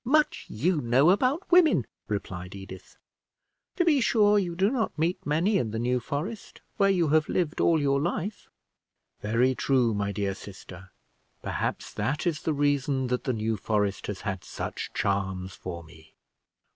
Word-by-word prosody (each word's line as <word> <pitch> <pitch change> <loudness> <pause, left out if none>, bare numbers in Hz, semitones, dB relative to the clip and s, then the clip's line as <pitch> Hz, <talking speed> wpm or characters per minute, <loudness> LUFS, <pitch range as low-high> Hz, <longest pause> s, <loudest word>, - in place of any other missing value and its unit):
"Much 300 +5 +2
you 155 - 0
know 130 +7 +4
about 260 - +2
women," 320 - +5 0.2
replied 95 -3 -5
Edith. 95 -1 -11 0.8
"To 350 - +2
be 300 -5 +4
sure, 210 -3 +4
you 175 -3 -2
do 195 +5 +2
not 235 -10 -1
meet 165 +4 0
many 175 +7 +2
in 110 - -1
the 110 - -4
New 125 +2 +1
Forest, 155 - -5 0.2
where 195 -1 +4
you 175 -5 +2
have 155 0 +3
lived 170 -3 0
all 165 -2 +4
your 140 -1 +1
life." 175 +5 -3 0.7
"Very 115 +5 +2
true, 125 -3 +2
my 100 -1 -1
dear 100 0 -1
sister; 95 -1 -11 0.5
perhaps - - -3
that 145 +2 -2
is 165 -4 0
the 160 - 0
reason 140 -2 +1
that 125 0 -1
the 130 - +1
New 110 0 -1
Forest 105 -1 -1
has 105 -2 -5
had 95 -5 -4
such - - -5
charms 95 -1 -1
for 85 -3 -7
me." 80 0 -18
135 Hz, 165 wpm, -27 LUFS, -, 0.8 s, women